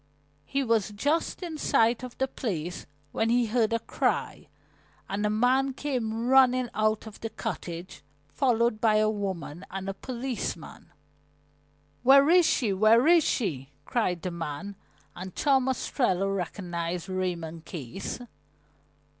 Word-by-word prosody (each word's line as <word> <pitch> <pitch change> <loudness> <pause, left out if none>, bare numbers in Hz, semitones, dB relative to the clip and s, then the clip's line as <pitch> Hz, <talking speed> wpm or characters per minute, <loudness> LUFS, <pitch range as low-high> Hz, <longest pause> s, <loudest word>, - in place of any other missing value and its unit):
He 275 - -1
was 225 -5 +1
just 290 - -1
in 320 -3 -5
sight 230 -2 +3
of 250 -1 -8
the 265 - +1
place 180 - -4 0.2
when 225 - 0
he 240 0 +3
heard 225 0 +1
a 230 - +2
cry, 230 - -2 0.6
and 200 +1 -2
a 210 - +2
man 255 +5 +2
came 235 -6 -2
running 255 -1 +5
out 215 0 +1
of 220 -2 -10
the 225 - -4
cottage, 175 -8 -6 0.3
followed 235 -4 +1
by 220 -2 +4
a 215 0 +3
woman 190 -5 -4
and 195 0 -5
a 195 - -2
policeman. 235 -9 -5 1.1
"Where 275 +4 +6
is 355 -2 +6
she? 220 -6 +1
Where 220 +5 +5
is 335 0 +6
she?" 145 - -2
cried 180 -8 -1
the 180 - -2
man, 170 +4 -5 0.4
and 185 0 -8
Tom 265 -2 +2
Ostrello 195 -7 0
recognized 175 -1 -4
Raymond 170 -4 -3
Case. 160 +1 -6
215 Hz, 140 wpm, -27 LUFS, 185-250 Hz, 1.1 s, Where